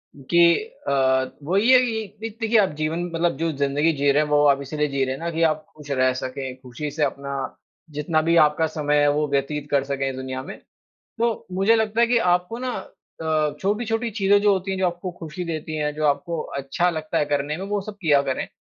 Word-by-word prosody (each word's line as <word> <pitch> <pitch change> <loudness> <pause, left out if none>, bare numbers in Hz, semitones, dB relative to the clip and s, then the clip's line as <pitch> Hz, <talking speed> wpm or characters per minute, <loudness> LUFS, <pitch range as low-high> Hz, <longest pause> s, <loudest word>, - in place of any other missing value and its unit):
गे 145 +5 0 0.5
अ, 130 -1 +2
वही 200 - +3
है 255 - +8
कि 225 -4 -1 0.2
द - - -14
देखिए 225 0 +3
आप 195 - +3
जीवन 160 +3 -1
मतलब 165 -2 +1
जो 165 +2 0
जिंदगी 145 +3 +2
जी 140 -1 +2
रहे 145 +2 +3
हैं 150 - -5
वो 145 0 +4
आप 140 -1 +3
इसीलिए 150 +2 -1
जी 140 -1 -1
रहे 130 - -2
हैं - - -10
ना 170 +1 -3
कि 165 0 -2
आप 155 -1 +1
खुश 150 -1 -13
रह 130 -1 +2
सकें, 130 0 -5
खुशी 130 +4 -6
से 150 +1 -1
अपना 140 0 -2 0.6
जितना 155 +1 +1
भी 165 +2 +2
आपका 150 +2 +1
समय 150 -2 0
है 145 - +4
वो 150 +1 0
व्यतीत 145 +1 -1
कर 140 -2 +3
सकें 135 -1 -2
इस 130 - -5
दुनिया 130 0 -5
में। - - -8 0.6
तो 230 0 -1
मुझे 195 +5 +3
लगता 220 0 0
है 235 - +6
कि 235 0 +3 0.2
आपको 180 +6 -3
ना 255 0 -3 0.5
अ, 155 -2 +1
छोटी-छोटी 225 +3 -1
चीज़ें 200 -1 +3
जो 205 -1 +5
होती 190 0 -1
हैं, 190 - -2
जो 190 - +2
आपको 175 +1 -3
खुशी 165 +2 -6
देती 160 -2 -4
हैं, 150 -1 -1
जो 155 0 -3
आपको 160 +3 0 0.2
अच्छा 140 +6 0
लगता 155 -1 -2
है - - +2
करने 145 +1 -1
में, 190 - -5
वो 205 0 -1
सब 205 +1 -8
किया 150 -6 +4
करें। 135 -2 -2
155 Hz, 230 wpm, -23 LUFS, 140-190 Hz, 0.6 s, है